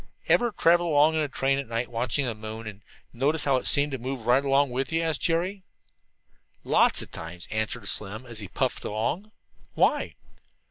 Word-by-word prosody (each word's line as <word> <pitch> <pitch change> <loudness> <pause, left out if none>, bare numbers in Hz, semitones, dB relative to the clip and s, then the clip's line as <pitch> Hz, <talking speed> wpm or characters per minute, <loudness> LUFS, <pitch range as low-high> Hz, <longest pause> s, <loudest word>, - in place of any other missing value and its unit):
"Ever 240 -1 +3
travel 175 -3 +3
along 150 0 +4
in 160 - 0
a 150 - 0
train 135 0 0
at 140 - -5
night 115 +1 -2
watching 120 +3 0
the 120 - -2
moon, 110 +1 -8
and 105 -1 -8 0.3
notice 145 +5 +1
how 135 -2 +3
it 125 - -1
seemed 145 +1 +5
to 135 - -4
move 130 -1 -5
right 125 +3 +4
along 140 -1 +2
with 130 +3 -2
you?" 165 +1 0
asked 160 -3 -1
Jerry. 180 +4 0 1.0
"Lots - - +3
of - - -14
times," 85 +2 -8
answered 110 0 -3
Slim, 105 +5 -2
as 120 -3 -5
he 100 - -4
puffed - - -2
along, 120 - -3 0.4
"Why?" - - +1
135 Hz, 190 wpm, -26 LUFS, 115-150 Hz, 1.0 s, seemed